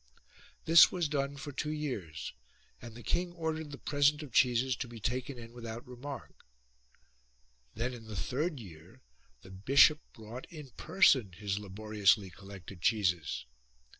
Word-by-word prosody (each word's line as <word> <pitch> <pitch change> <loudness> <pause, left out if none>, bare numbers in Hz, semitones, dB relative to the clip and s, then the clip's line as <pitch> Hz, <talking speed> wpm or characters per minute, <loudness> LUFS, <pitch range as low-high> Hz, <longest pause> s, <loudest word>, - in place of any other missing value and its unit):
This 165 0 +8
was 175 -3 0
done 140 -1 -2
for 145 +1 -6
two 150 +2 -3
years 125 - -4 0.5
and 115 -1 -10
the 120 - -10
king 175 0 0
ordered 160 -2 -3
the 140 - -8
present 145 +2 +2
of 135 -6 -11
cheeses 125 +1 +3
to 130 - -4
be 115 -1 -10
taken 125 +4 -3
in 115 0 -10
without 115 0 -7
remark: 125 +1 -9 1.3
then 120 +3 -2
in 115 -2 -10
the 110 - -7
third 145 - -2
year 80 -8 -13 0.4
the 95 - -13
bishop 135 +10 +5
brought 115 +3 -9
in 150 -6 -10
person 130 - +3
his 100 +2 -3
laboriously 105 -1 +1
collected 95 -2 -11
cheeses. 90 - +1
120 Hz, 145 wpm, -32 LUFS, 105-145 Hz, 1.3 s, This